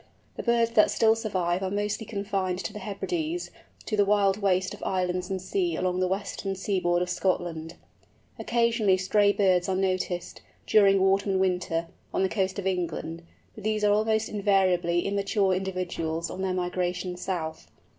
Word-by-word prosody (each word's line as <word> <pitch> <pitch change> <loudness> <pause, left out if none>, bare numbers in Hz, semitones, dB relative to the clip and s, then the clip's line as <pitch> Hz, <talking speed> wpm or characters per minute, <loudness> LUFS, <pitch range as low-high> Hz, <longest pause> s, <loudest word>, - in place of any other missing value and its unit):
The - - -4
birds 235 -1 +2
that 215 -2 +5
still 220 -1 +4
survive 185 -5 -1
are 190 - -1
mostly 205 +2 -2
confined 195 -3 -2
to 215 - -4
the 210 - -6
Hebrides, 320 - -3 0.3
to 215 - -1
the 205 - +4
wild 200 -1 +3
waste 185 -1 +1
of - - -11
islands 180 0 -1
and 190 -1 -2
sea 345 - -1
along 185 0 -1
the 185 - +2
western 195 0 -3
seaboard 180 -2 0
of 180 - -5
Scotland. 175 -3 -2 0.6
Occasionally 230 -5 +2
stray 205 +2 +3
birds 185 -3 +2
are 190 - +1
noticed, 185 -2 -2 0.2
during 195 -2 +5
autumn 195 +1 +2
and 190 - +1
winter, 180 -3 0 0.3
on - - +2
the 190 - +2
coast 190 -2 -1
of 200 - -4
England, 170 -3 -2 0.3
but 215 - -11
these 215 0 0
are 205 0 +5
almost 220 +1 +1
invariably 185 -4 +2
immature 200 -1 +1
individuals 180 -3 -3
on 190 - -5
their 190 -1 -1
migration 180 0 -2
south. 170 -3 -4
190 Hz, 165 wpm, -27 LUFS, 180-205 Hz, 0.6 s, that